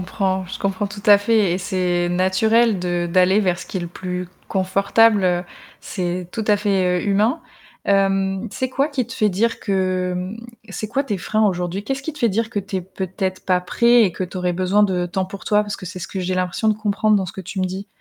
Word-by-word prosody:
Comprends, 190 0 -1
je 185 - -7
comprends 195 0 -1
tout 205 0 -9
à 205 -1 +8
fait 205 -3 +2
et 180 - -1
c'est 180 -2 0
naturel 195 +4 +2
de 175 -1 -1
d'aller 185 +3 +4
vers 180 -4 +1
ce - - -7
qui - - -6
est - - -1
le 175 - -4
plus 180 +1 -5 0.2
confortable, 195 +3 +3
heu, 180 -1 +1 0.4
c'est 180 -1 -3
tout 225 - -3
à 210 - +5
fait, 190 -3 +1
heu, - - -5
humain. 215 +10 +2 0.4
Hem, 195 +1 +1
c'est 260 - -2
quoi 275 +3 +1
qui 265 -5 -2
te - - -9
fait 215 - +2
dire 220 +5 0
que, 185 -2 0
mmh 185 +4 -4 0.3
c'est 215 +2 -5
quoi 275 +5 0
tes 210 -7 -2
freins 215 +3 +1
aujourd'hui? 180 +1 -2
Qu'est-ce 270 +2 -3
qui 315 - -4
te 300 - -13
fait 240 -5 +3
dire 220 +2 -1
que 215 - -2
tu 200 0 -4
es 185 - -1
peut-être 185 +1 -4
pas 180 -1 +2
prêt 235 +6 +4
et 190 - +3
que 185 - -4
tu 180 - -9
aurais 180 -1 0
besoin 185 +3 +2
de 180 -3 +1
temps 185 +2 -2
pour 195 +1 -9
toi? 210 0 +3
Parce 205 -1 -5
que 185 - -9
c'est 185 +1 -7
ce - - -6
que 195 - -5
j'ai 185 0 -1
l'impression 185 +4 -1
de 215 - +3
comprendre 215 0 +1
dans 190 - -1
ce - - -7
que - - -7
tu 190 +1 -5
me - - +1
dis, 190 +2 -6
190 Hz, 245 wpm, -21 LUFS, 180-210 Hz, 0.4 s, à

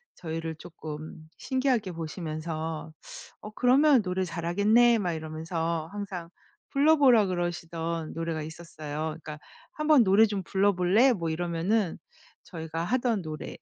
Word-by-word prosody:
저희를 165 -1 -5
쪼끔 155 -1 -9
신기하게 255 -7 0
보시면서 160 -1 -5 0.5
"어 210 - -7
그러면 260 +4 +4
노래 185 -1 -1
잘하겠네?" 205 +8 +3
막 180 -4 -1
이러면서 160 +1 -3
항상 195 -4 -6 0.4
불러 305 +3 +4
보라 250 -7 +6
그러시던 170 -2 -3
노래가 165 -1 -3
있었어요. 155 -2 -8 0.3
그러니까 150 -1 -7 0.3
"한번 305 -4 +4
노래 200 +3 +6
좀 205 -3 -3
불러볼래?" 195 +6 +3
뭐 170 -6 -3
이러면은 175 +4 0 0.5
저희가 165 -1 -5
하던 240 +1 0
노래. 155 -2 -7
175 Hz, 310 characters per minute, -28 LUFS, 160-215 Hz, 0.5 s, 보라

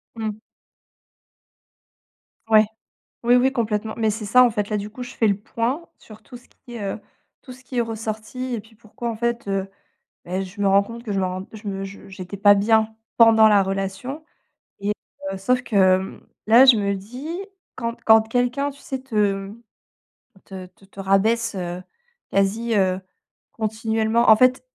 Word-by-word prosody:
Mmh. 215 -2 -4 2.1
Ouais! 215 -1 +6 0.6
Oui, 240 +1 +5
oui, 260 +2 +3
complètement. 220 -3 -2
Mais, 220 -1 +1
c'est 215 +1 -4
ça, 250 +5 +6
en 245 - +5
fait. 210 -2 -3
Là, 210 - 0
du 205 +1 -5
coup, 250 +3 -8
je 245 - -9
fais 225 - +2
le 200 -1 +1
point 240 +10 -3
sur 215 -1 -15
tout 245 - -11
ce 245 - -22
qui, 240 -3 -12
heu, 200 0 -3 0.4
tout 255 - -12
ce 255 +1 -13
qui 255 -1 -7
est - - +4
ressorti 225 +3 -5
et 230 - -2
puis, 220 +1 -21
pourquoi, 230 +2 -7
en 225 - -3
fait, 235 -2 -2
heu, 195 0 -1 0.6
beh, 185 +2 -3
je 190 +2 -9
me 200 - +3
rends 200 +1 +5
compte 230 +3 -9
que 215 -4 -4
je 195 - -1
me - - +1
rends, 185 +1 -4
je 215 -1 -8
me 195 0 -4
je 195 +1 -10
j'étais 190 0 -8
pas 205 +1 +6
bien 220 +2 +2 0.2
pendant 225 -1 +7
la 205 -2 +5
relation 195 +9 -4 0.6
et 205 +1 0 0.4
heu, 190 - -5
sauf 250 +5 +1
que, 215 - -3
hem, 190 0 +2 0.2
là, 235 +4 +8
je 255 -4 +7
me 200 -1 0
dis 245 +10 -8 0.5
quand 235 -1 -3
quand 220 0 +7
quelqu'un, 245 +4 0
tu 280 - -16
sais, 265 -1 -5
te, 260 -3 -11
hem, 200 +2 -1 0.8
te 190 -1 -8
te 195 - -23
te 195 0 -16
rabaisse, 215 +4 +1
heu, 180 0 -4 0.5
quasi, 215 +4 +1
heu, 185 -2 +2 0.5
continuellement. 220 +1 0
En 220 - +9
fait, 255 +3 +3
220 Hz, 185 wpm, -22 LUFS, 200-235 Hz, 2.1 s, En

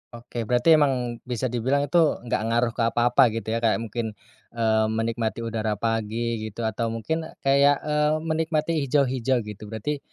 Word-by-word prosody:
Oke, 115 -1 -6
berarti 125 +6 +3
emang 125 -5 0
bisa 125 0 -2
dibilang 130 +4 +1
itu 145 +5 +2 0.2
nggak 115 -2 -1
ngaruh 115 0 +1
ke 120 - -13
apa-apa 120 +2 +4
gitu 110 -1 -3
ya, 115 - 0
kayak 115 -2 +2
mungkin, 110 -1 -4 0.4
eee, 110 -1 +2
menikmati 115 +1 -2
udara 110 -2 -2
pagi 115 +1 -2
gitu, 110 +2 -6
atau 110 +1 -1
mungkin 160 +9 -3 0.2
kayak, 140 +1 +5
eee, 150 0 +1
menikmati 160 0 0 0.2
hijau-hijau 130 -3 +1
gitu, 105 0 -9
berarti, 115 +7 -3
120 Hz, 160 wpm, -25 LUFS, 110-135 Hz, 0.4 s, kayak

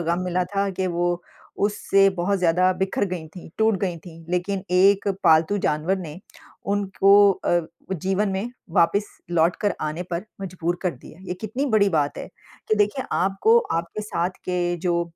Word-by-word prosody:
गम 170 +1 0
मिला 180 0 0
था 200 0 +1
कि 190 0 -2
वो 175 0 -1 0.4
उससे 195 -1 +3
बहुत 195 +3 +1
ज़्यादा 180 +1 +3
बिखर 190 +2 -1
गई 180 -4 -5
थीं, 175 +2 -12
टूट 220 -1 +3
गई 180 -3 -1
थीं। 165 -1 -12
लेकिन 185 +2 -1
एक 195 +2 +4 0.2
पालतू 160 +6 +4
जानवर 155 +6 0
ने 170 -2 -8 0.6
उनको 200 0 +5
अ, 175 -2 0 0.3
जीवन 190 +4 0
में 195 +5 -3 0.3
वापिस 200 +5 +3 0.3
लौट 170 0 +2
कर 205 - 0
आने 155 +3 -3
पर 175 +3 -3 0.2
मजबूर 175 -2 -3
कर 180 - +1
दिया। 145 +6 -15
ये 180 - -2
कितनी 245 +7 -2
बड़ी 200 -1 +5
बात 150 -5 0
है - - -7 0.4
कि 215 - +3
देखिए 210 +6 +1
आपको, 195 - +3
आपके 170 - -3
साथ 180 -4 -1
के 175 -1 -1
जो 170 0 +2
185 Hz, 170 wpm, -23 LUFS, 170-200 Hz, 0.6 s, उनको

